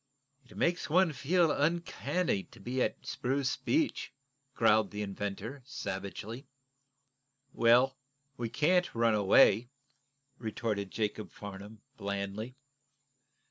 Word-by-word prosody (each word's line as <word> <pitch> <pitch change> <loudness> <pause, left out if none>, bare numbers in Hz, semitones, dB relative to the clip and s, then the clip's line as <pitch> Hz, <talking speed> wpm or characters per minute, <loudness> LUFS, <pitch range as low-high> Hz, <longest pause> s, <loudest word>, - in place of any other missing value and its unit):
"It - - -13
makes 170 -4 0
one 175 0 +4
feel 165 +4 +2
uncanny 170 - 0
to 115 - -17
be 125 +6 -2
at - - -1
Spruce 135 +1 -1
Beach," 310 -1 0 0.4
growled 110 -1 +4
the 105 0 -4
inventor, 100 +6 -5
savagely. 110 +3 -6 1.1
"Well, 125 +3 +4 0.4
we 120 -4 -3
can't 175 +6 +2
run 115 -1 +3
away," 105 +3 +5 0.7
retorted 110 -3 -2
Jacob 105 +1 -3
Farnum, 100 +1 -10
blandly. 100 +4 -4
115 Hz, 100 wpm, -31 LUFS, 105-140 Hz, 1.1 s, away